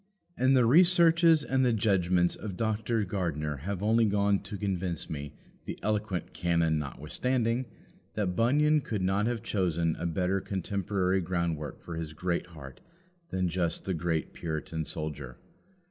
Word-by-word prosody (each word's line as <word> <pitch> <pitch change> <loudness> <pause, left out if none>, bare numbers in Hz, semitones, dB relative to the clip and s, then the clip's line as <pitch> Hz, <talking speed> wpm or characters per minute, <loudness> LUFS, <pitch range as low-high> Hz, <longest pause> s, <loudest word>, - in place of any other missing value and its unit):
And 130 -1 +3
the 125 - +5
researches 165 +2 +5
and 130 -1 +1
the 125 -2 +3
judgments 90 -5 +2
of 100 -4 -7
Dr. 110 0 0
Gardiner 75 -6 -2
have 95 +7 -4
only 115 +2 +4
gone 100 -1 +2
to 105 - -7
convince 95 -4 -2
me, 75 -2 -6 0.3
the - - -5
eloquent 105 -4 -2
canon 85 -3 +1
notwithstanding, 115 - -1 0.5
that 95 -4 -1
Bunyan 150 +7 +3
could 105 -7 -3
not 100 +3 +1
have 120 -2 -2
chosen 85 -6 0
a 85 - -1
better 90 +3 0
contemporary 95 -1 -1
groundwork 85 -4 -3
for 85 -2 -6
his 80 -1 -5
Greatheart 80 -5 -4 0.5
than 95 -1 0
just 85 -1 -1
the 95 - -1
great 80 -1 -2
Puritan 80 0 -4
soldier. 75 -6 -5
95 Hz, 145 wpm, -29 LUFS, 85-110 Hz, 0.5 s, the